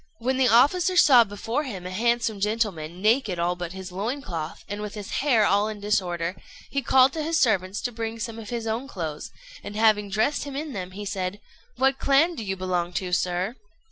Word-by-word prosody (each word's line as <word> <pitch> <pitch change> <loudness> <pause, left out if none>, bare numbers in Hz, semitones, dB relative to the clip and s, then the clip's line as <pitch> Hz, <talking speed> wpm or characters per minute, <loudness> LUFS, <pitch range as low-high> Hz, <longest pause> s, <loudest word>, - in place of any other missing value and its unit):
When 255 +3 -1
the 260 -1 +4
officer 330 +10 +4
saw 255 -8 +8
before 225 +6 -3
him 200 -10 -6
a 180 - -5
handsome 230 +1 0
gentleman, 195 -5 -2
naked 215 -4 +2
all 175 +1 0
but 175 -1 -6
his 190 -1 -8
loincloth, 190 - -4
and 205 +1 -5
with 210 0 -6
his 205 -2 -7
hair 245 -7 +4
all 205 +2 +3
in 215 -1 -5
disorder, 180 -4 -1 0.4
he 275 - 0
called 260 +1 +5
to 320 - -3
his 325 +2 0
servants 195 -4 +1
to 245 - -2
bring 225 0 -4
some 230 0 -5
of 215 - -9
his 235 -2 -3
own 225 +4 -2
clothes, 160 - -5 0.3
and, 205 - -7
having 215 -2 +3
dressed 220 +9 +1
him 285 -2 -7
in 295 0 -4
them, 185 -3 -5
said 190 0 -3 0.4
"What 270 0 +2
clan 285 +6 +3
do 235 - -6
you 195 -2 -2
belong 180 -2 -2
to, 180 0 -3
sir?" 180 +5 0
215 Hz, 205 wpm, -25 LUFS, 185-250 Hz, 0.4 s, saw